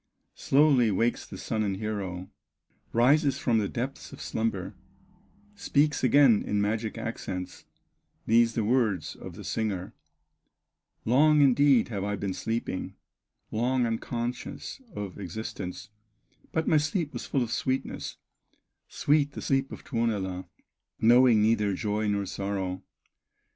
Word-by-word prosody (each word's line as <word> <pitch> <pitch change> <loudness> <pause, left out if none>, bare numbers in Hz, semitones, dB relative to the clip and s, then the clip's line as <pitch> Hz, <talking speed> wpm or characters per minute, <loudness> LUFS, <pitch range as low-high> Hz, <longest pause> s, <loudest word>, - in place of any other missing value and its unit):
Quickly 135 -5 +5
wakes 115 +4 0
the - - -9
son 110 -1 -2
and 100 -3 -1
hero, 95 -4 -4 0.6
Rises 140 +5 +3
from 115 -3 +2
the 105 - 0
depths 130 +3 -5
of - - -11
slumber, 110 -4 -2 0.8
Speaks 150 -8 +1
again 130 -3 +5
in 105 - -1
magic 110 +2 -1
accents, 90 -5 -5 0.6
These 115 0 +4
the 115 - +1
first 105 - -1
words 105 - +1
of - - -10
the - - -9
singer: 100 -5 -3 1.1
"Long, 150 +5 +5
indeed, 140 -2 +4
have 100 -4 -3
I 105 0 -1
been 100 -1 -3
sleeping, 110 +1 -3 0.6
Long 125 +3 +1
unconscious 120 - -4
of 100 -1 -6
existence, 95 0 -6 0.6
But 160 0 -1
my 155 - +5
sleep 150 +1 -1
was 120 - -6
full 135 - +1
of 115 - -5
sweetness, 130 +2 -2 0.7
Sweet 145 -1 +1
the - - -6
sleep 135 0 0
in - - -6
Tuonela, 100 -7 -2 0.5
Knowing 120 -1 +6
neither 105 -3 +2
joy 105 +1 -1
nor 100 -1 0
sorrow!" 95 -1 -3
115 Hz, 130 wpm, -28 LUFS, 100-130 Hz, 1.1 s, Knowing